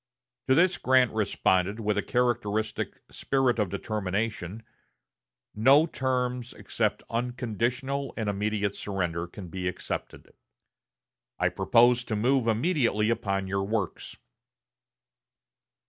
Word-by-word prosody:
To 130 - +5
this 180 +3 +3
Grant 130 -1 +4
responded 100 -1 +1
with 105 -1 0
a - - +1
characteristic 110 -3 -1
spirit 135 -3 +1
of 105 -3 +1
determination: 105 0 -3 0.9
"No 135 +8 +5
terms 125 -4 -2
except - - -2
unconditional 125 +3 -2
and 110 -2 -2
immediate 105 0 -1
surrender 85 -5 -3
can 90 0 -10
be 90 +1 -4
accepted. 90 - -5 1.0
I - - +2
propose 120 +1 +4
to 110 - -2
move 125 +3 +2
immediately 115 - +2
upon 100 -4 -1
your 95 +1 -1
works." 100 -2 -3
110 Hz, 105 wpm, -27 LUFS, 100-125 Hz, 1.0 s, To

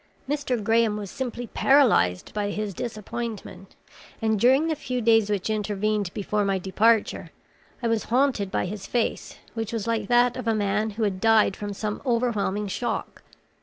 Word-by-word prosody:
Mr. 270 -5 -1
Graham 225 0 +2
was 205 -3 -6
simply 245 -2 -4
paralyzed 225 - +3
by 205 -1 -1
his 205 -1 -3
disappointment, 215 -3 -6 0.4
and 220 -2 +1
during 265 +8 +4
the 320 - 0
few 250 -3 -3
days 225 -2 +3
which 200 -3 -1
intervened 210 -2 -1
before 210 +1 -1
my 195 -1 +1
departure, 210 +4 +1 0.5
I - - +2
was 230 -1 0
haunted 245 -5 +1
by 190 - -1
his 200 +1 -6
face, 240 -2 -2 0.2
which 225 -2 -4
was 225 -3 -3
like 225 -3 -1
that 245 +1 +3
of - - -5
a 225 - +2
man 210 +1 0
who 230 - 0
had 190 -3 -1
died 220 -3 +4
from 205 -1 -5
some 210 +1 -4
overwhelming 230 -5 0
shock. 240 +5 -3
215 Hz, 165 wpm, -25 LUFS, 205-235 Hz, 0.5 s, during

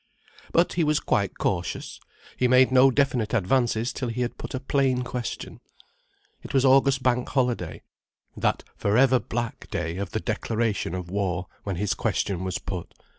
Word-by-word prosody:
But 170 +1 +3
he 170 - +1
was 150 -1 +2
quite - - 0
cautious. - - -2 0.4
He 125 - +2
made 130 +1 +5
no 130 +1 +7
definite 125 -5 +1
advances 115 +2 +1
till 125 - -3
he 120 +2 -3
had 120 - -2
put - - -5
a - - -2
plain 130 -2 +1
question. 125 -1 -5 0.8
It - - -7
was 135 0 +4
August 135 0 +4
Bank 125 -1 +1
Holiday, 125 -4 -1 0.5
that - - 0
for 105 +2 +1
ever 130 -1 +5
black 120 0 -4
day 85 0 -3
of 100 -1 -3
the - - -2
declaration 110 -6 -1
of 90 -1 -6
war, 95 -3 -1 0.2
when 100 -2 -2
his 100 +3 0
question 95 -2 -1
was 95 -1 -2
put. 90 -1 -6
120 Hz, 170 wpm, -25 LUFS, 100-130 Hz, 0.8 s, no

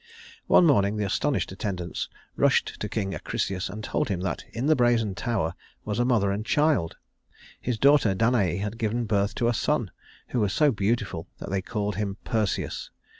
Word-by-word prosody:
One 180 - +6
morning 105 -9 +4
the 105 - 0
astonished 135 +6 0
attendants 95 -3 -4 0.3
rushed - - +2
to 105 - -3
King 100 -3 -2
Acrisius 95 +4 -2
and 105 +3 -7
told - - -1
him 95 -3 -1
that 95 -2 -2
in 120 +3 -3
the 155 +1 +5
brazen 120 -5 +2
tower 95 -6 -1 0.3
was 105 +1 -2
a 120 - +3
mother 110 -6 +2
and 100 +2 -2
child 145 - +1 0.6
his 125 -2 -1
daughter 135 -6 +4
Danaë 100 -5 +2
had 105 +2 -4
given 115 +2 0
birth 100 -1 0
to 120 - +1
a 120 - +2
son 115 - 0 0.4
who 125 - -1
was 105 -3 +1
so 150 -2 +4
beautiful 100 -6 -1
that - - -7
they 95 -1 0
called 105 0 -3
him 100 -1 -2
Perseus. 110 -5 -1
105 Hz, 180 wpm, -26 LUFS, 95-120 Hz, 0.6 s, One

